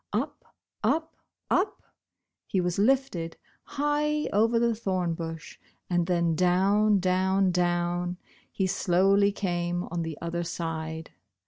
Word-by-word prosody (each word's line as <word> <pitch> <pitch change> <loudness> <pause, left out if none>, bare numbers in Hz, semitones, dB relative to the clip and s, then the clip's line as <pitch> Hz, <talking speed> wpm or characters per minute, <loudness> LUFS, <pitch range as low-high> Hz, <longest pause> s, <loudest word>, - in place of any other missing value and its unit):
Up, - - -4 0.3
up, 320 0 0 0.4
up 395 +3 +1 0.6
he 190 - 0
w^as 180 +2 +1
lifted, 245 -10 +1 0.3
high 295 +1 0
over 225 +3 +3
the 235 0 +3
thorn 185 -6 -1
bush, 165 -1 -7 0.3
and 175 -1 +2
then 170 -2 +2
down, 195 +5 +3
down, 190 +1 +2
down 175 0 0 0.3
he 190 - 0
slowly 195 +2 +3
came 175 -3 -2
on 170 0 -2
the 165 -2 -4
other 170 +1 -3
side. 160 -1 -4
180 Hz, 120 wpm, -27 LUFS, 175-205 Hz, 0.6 s, over